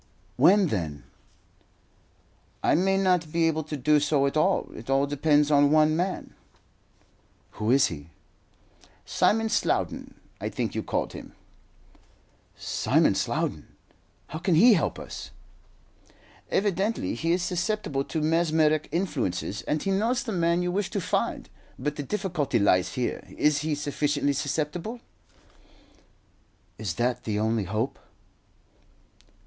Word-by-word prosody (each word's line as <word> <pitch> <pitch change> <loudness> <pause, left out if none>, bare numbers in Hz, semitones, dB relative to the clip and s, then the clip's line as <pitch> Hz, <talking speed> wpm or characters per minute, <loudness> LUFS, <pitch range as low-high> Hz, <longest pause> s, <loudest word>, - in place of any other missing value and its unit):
"When, 195 -1 +5
then?" 80 - -3 1.6
"I - - +3
may 195 +3 +2
not 180 -4 +1
be 165 0 +2
able 160 -1 0
to 150 -1 -5
do 150 +3 +3
so 145 -1 +2
at 140 - -1
all. 185 +5 +1
It 115 +4 -10
all 135 +1 +3
depends 145 +1 +2
on 145 -1 +5
one 155 +1 +4
man." 180 +3 -3 1.2
"Who 110 +1 -3
is 135 +2 +5
he?" 75 -2 -6 1.0
"Simon 225 +1 +2
Slowden, 220 - -1 0.2
I - - -3
think - - -3
you - - -2
called - - -2
him." - - -10 1.2
"Simon - - +2
Slowden! - - -2 0.6
How 155 - -5
can 175 0 +1
he 230 +9 +7
help 170 - 0
us?" - - -8 1.2
"Evidently 200 - 0
he 165 +8 -1
is 175 0 0
susceptible 175 -5 -1
to 160 - -3
mesmeric 155 -1 +2
influences, 120 - -2
and 150 0 -1
he 195 - 0
knows 230 +6 +1
the 235 - -4
man 170 -1 +1
you 180 - -1
wish 195 +1 -1
to 200 - -2
find. 180 - -2 0.3
But 145 +3 -3
the 150 - -4
difficulty 170 - -1
lies 95 -3 +2
here. 125 - -2
Is 150 -1 +3
he 150 0 -1
sufficiently 145 0 0
susceptible?" 155 - -3 1.8
"Is 100 -7 -3
that 125 +3 -1
the 105 -2 -2
only 110 -1 0
hope?" 110 +7 -2
155 Hz, 130 wpm, -26 LUFS, 135-180 Hz, 1.8 s, he